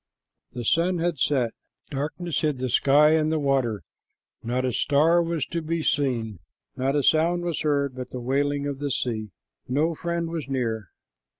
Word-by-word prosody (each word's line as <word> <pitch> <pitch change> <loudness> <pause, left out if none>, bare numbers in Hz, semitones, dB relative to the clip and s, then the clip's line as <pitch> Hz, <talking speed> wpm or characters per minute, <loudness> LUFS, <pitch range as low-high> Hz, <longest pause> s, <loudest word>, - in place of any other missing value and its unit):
The 120 -1 -5
sun 175 +7 +2
had 170 -3 -1
set, 125 -4 +1 0.4
darkness 150 +3 -2
hid 150 -3 0
the 130 0 -2
sky 145 +5 +5
and 155 -1 +2
the 160 - +1
water, 135 - 0 0.6
not 125 +2 -1
a 125 - -1
star 150 +7 +3
was 165 -4 -1
to 170 - -3
be 165 +1 -2
seen. 115 - 0 0.4
Not 135 +2 0
a 145 - +2
sound 170 +4 +3
was 170 -3 -2
heard 140 -3 +1
but 125 0 -7
the 125 - -6
wailing 140 +3 0
of 140 -1 -3
the 145 0 -2
sea. 110 -5 -2 0.4
No 150 +6 +1
friend 170 0 -3
was 160 -5 -4
near. 115 -7 -2
145 Hz, 175 wpm, -25 LUFS, 130-160 Hz, 0.6 s, sky